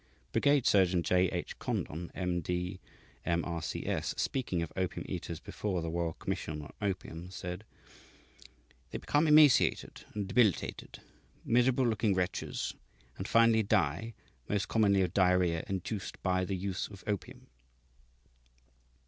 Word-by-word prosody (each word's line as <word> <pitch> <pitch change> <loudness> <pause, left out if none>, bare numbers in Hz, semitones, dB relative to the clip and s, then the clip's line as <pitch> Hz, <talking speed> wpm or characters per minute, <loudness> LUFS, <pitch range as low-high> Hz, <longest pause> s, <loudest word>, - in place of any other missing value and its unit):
Brigade 140 -3 +3
Surgeon 90 -3 +4
J. 90 +1 +3
H. 90 -1 -5
Condon, 85 +3 -3
M. 90 -2 -1
D., 90 +3 -3 0.4
M. 85 0 0
R. 85 -1 -3
C. - - -4
S., - - -1
speaking 95 -11 -1
of 85 - -7
opium 95 -1 -2
eaters - - -5
before 95 -5 -3
the 80 - -3
Royal 85 -1 -1
Commission 75 0 -4
on - - -11
Opium, 90 -3 -3
said: 90 +2 -6 1.2
"They - - -4
become 150 +2 +1
emaciated 150 -3 +5
and 105 -2 -2
debilitated, 105 -2 +1 0.4
miserable 125 +2 +3
looking 110 -3 +1
wretches, 90 -1 -2 0.5
and 95 - -3
finally 115 -1 +5
die, 100 +1 0 0.3
most 100 -1 0
commonly 100 -3 +3
of 90 -1 -2
diarrhoea 90 -3 +3
induced 95 +2 -4
by 95 -1 +1
the 95 +1 -2
use 95 0 -3
of 100 -2 -12
opium." 100 -3 -4
95 Hz, 135 wpm, -31 LUFS, 90-110 Hz, 1.2 s, emaciated